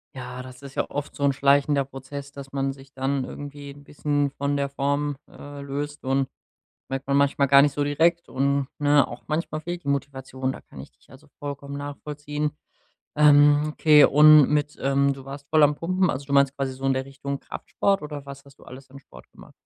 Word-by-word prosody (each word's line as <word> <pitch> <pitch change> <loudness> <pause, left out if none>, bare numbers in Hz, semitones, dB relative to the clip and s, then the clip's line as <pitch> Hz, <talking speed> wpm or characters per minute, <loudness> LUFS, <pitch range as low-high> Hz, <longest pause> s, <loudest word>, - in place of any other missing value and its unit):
Ja, 125 -1 -7
das 130 +1 -12
ist 140 -1 -10
ja - - -2
oft 145 0 -5
so 140 - -4
'n 140 -1 +3
schleichender 140 +1 +2
Prozess, 140 +1 -9
dass 140 -1 -10
man 135 0 -1
sich 135 0 -17
dann 135 +1 -1
irgendwie 145 +1 -9
'n 145 +1 -15
bisschen 145 -1 -1
von 140 0 -2
der 140 0 0
Form, 145 +1 -1
äh, 145 0 -10
löst 145 +1 -5
und 135 0 0 0.6
merkt 135 0 -4
man 140 0 +1
manchmal 140 0 +2
gar 140 +1 +7
nicht 145 0 +2
so 145 - -2
direkt 165 +4 +1
und 140 +1 0
ne, 145 -2 +3
auch 120 - -9
manchmal 155 0 -3
fehlt 175 0 -6
die - - -6
Motivation. 130 -2 -3
Da - - -10
kann 65 - -13
ich 70 - -11
dich - - -31
also 145 +3 -17
vollkommen 140 0 -6
nachvollziehen. 145 +1 -4 0.7
Ähm, 145 0 +5
okay 150 -1 +6
und 150 0 +7
mit 150 0 -1
ähm, 140 +1 +2
du 135 -1 -11
warst 140 +1 -9
voll 155 -1 +4
am 145 0 +4
Pumpen, 185 +3 0
also 140 +1 -5
du 140 - -4
meinst 140 -1 +4
quasi 135 -1 -3
so 135 +1 -7
in 135 - +3
der 130 0 -2
Richtung 140 0 -6
Kraftsport 195 +7 -2
oder 145 -2 -7
was 140 0 -10
hast 140 0 -19
du - - -16
alles 135 +1 -12
an 140 - -11
Sport - - -17
gemacht? - - -16
140 Hz, 215 wpm, -24 LUFS, 135-145 Hz, 0.7 s, gar